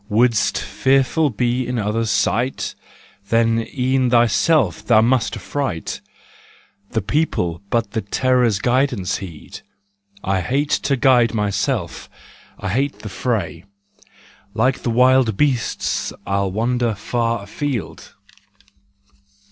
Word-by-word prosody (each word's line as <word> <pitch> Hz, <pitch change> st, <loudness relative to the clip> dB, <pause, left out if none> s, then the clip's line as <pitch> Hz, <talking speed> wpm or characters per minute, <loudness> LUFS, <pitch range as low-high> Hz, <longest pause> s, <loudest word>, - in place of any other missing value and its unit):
Wouldst 115 Hz, 0 st, +2 dB
fearful 135 Hz, +3 st, +1 dB
be 120 Hz, +2 st, -1 dB
in 125 Hz, 0 st, -2 dB
others' 110 Hz, +1 st, -1 dB
sight? 120 Hz, +5 st, 0 dB, 0.6 s
Then 115 Hz, 0 st, +2 dB
e'en 130 Hz, -1 st, +1 dB
thyself 120 Hz, +6 st, +3 dB
thou 110 Hz, -3 st, +4 dB
must 120 Hz, +1 st, +1 dB
affright: 105 Hz, -, -4 dB, 0.9 s
The 110 Hz, -4 st, -2 dB
people 95 Hz, -, -1 dB
but 115 Hz, -3 st, 0 dB
the 110 Hz, -, -2 dB
Terror's 125 Hz, +1 st, +1 dB
guidance 125 Hz, -4 st, 0 dB
heed. 85 Hz, -6 st, -10 dB, 0.6 s
I 95 Hz, -1 st, 0 dB
hate 140 Hz, -, -1 dB, 0.2 s
to 140 Hz, -, +2 dB
guide 120 Hz, -3 st, +4 dB
myself, 105 Hz, -, -2 dB, 0.5 s
I 95 Hz, -, -3 dB
hate 135 Hz, +8 st, -1 dB
the 110 Hz, -, -5 dB
fray. 95 Hz, -8 st, -2 dB, 0.9 s
Like 125 Hz, +4 st, +1 dB
the -, -, -2 dB
wild 125 Hz, -2 st, +3 dB
beasts 135 Hz, -7 st, 0 dB
I'll 100 Hz, 0 st, 0 dB
wander 115 Hz, +2 st, 0 dB
far 115 Hz, +1 st, -2 dB
afield. 125 Hz, +3 st, -5 dB
115 Hz, 110 wpm, -20 LUFS, 105-130 Hz, 0.9 s, thou